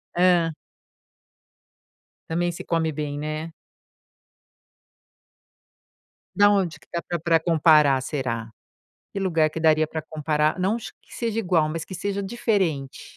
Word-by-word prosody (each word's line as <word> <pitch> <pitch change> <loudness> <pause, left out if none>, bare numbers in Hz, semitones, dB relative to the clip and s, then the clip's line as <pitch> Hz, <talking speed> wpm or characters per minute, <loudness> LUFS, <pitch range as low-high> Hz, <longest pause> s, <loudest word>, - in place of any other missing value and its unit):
Hã. 175 -2 +4 1.8
Também 175 +2 0
se 170 - -8
come 165 -1 0
bem, 145 -1 -4
né. 155 +2 -4 2.8
Da 205 0 +6
onde 190 -5 +1
que - - -24
dá 170 -1 -2
pra 175 -1 -4
pra 165 0 +3
comparar 155 -4 +4
será? 125 -5 -3 0.6
Que 200 - -4
lugar 165 -5 +2
que 160 - -6
daria 155 -1 +3
para 160 0 -4
comparar, 155 +1 0
não 200 +5 +1
que 230 - -12
seja 230 -2 -2
igual, 175 -7 +2
mas 165 0 -4
que 185 - -8
seja 200 +2 -3
diferente? 190 - -1
165 Hz, 130 wpm, -24 LUFS, 155-185 Hz, 2.8 s, Da